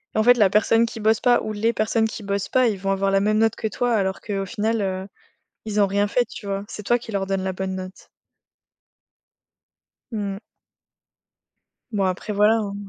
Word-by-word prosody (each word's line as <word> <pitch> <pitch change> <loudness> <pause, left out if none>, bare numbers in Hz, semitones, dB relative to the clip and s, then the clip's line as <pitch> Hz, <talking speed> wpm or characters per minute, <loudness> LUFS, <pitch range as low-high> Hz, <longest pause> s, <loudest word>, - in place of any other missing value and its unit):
En 220 - +3
fait, 245 +1 +7
la 200 -4 +5
personne 225 +3 +3
qui 225 -1 -7
bosse 220 +1 +3
pas, 245 0 +3
ou 215 - -4
les 225 +2 0
personnes 220 +1 +1
qui 220 -1 -8
bossent 200 0 -2
pas, 255 -1 +3
ils 200 -3 -3
vont 195 0 -1
avoir 195 0 0
la 195 - +3
même 215 +2 +2
note 225 -1 +2
que 220 - -2
toi 240 +3 -1
alors 190 -2 0
qu'au 195 -2 -3
final, 220 +1 -1
heu, 190 -1 -2 0.6
ils 210 -1 0
ont - - +6
rien 200 +1 +1
fait, 245 +4 +2
tu 220 - -10
vois? 195 0 -3
C'est 210 - -7
toi 240 +4 +3
qui 230 -1 -10
leur 195 -1 -1
donne 195 -1 -1
la 190 - -1
bonne 190 0 -3
note. 185 0 -8 2.0
Mmh. 200 -2 -4 1.5
Bon, 205 -3 0
après, 185 +3 -2
voilà, 210 +2 +4
hein. 200 -2 -3
205 Hz, 205 wpm, -23 LUFS, 195-225 Hz, 2.0 s, fait